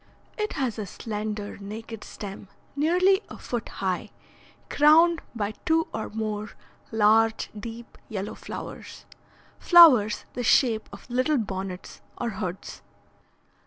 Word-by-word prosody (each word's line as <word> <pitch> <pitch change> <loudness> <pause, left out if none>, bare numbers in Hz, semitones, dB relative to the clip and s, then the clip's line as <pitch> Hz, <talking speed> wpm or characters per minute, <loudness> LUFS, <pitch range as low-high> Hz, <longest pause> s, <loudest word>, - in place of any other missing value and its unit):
It 425 -1 -2
has 255 -7 -2
a 205 - -4
slender, 210 0 -5
naked 220 +2 -8
stem 200 -1 -8 0.3
nearly 365 +7 +3
a - - -9
foot 240 -3 -4
high, 190 +2 -3 0.6
crowned 325 +3 +5
by 210 -2 -2
two 325 -1 +2
or 220 - -4
more 215 -1 -3 0.4
large 220 +1 +3
deep 230 +2 -9
yellow 200 -2 -4
flowers, - - -9 0.5
flowers 265 - +7
the 250 - -3
shape 230 -2 +3
of - - -12
little 255 +4 +1
bonnets 190 -4 -5 0.2
or 235 - -2
hoods. 190 -2 -6
225 Hz, 120 wpm, -26 LUFS, 210-280 Hz, 0.6 s, flowers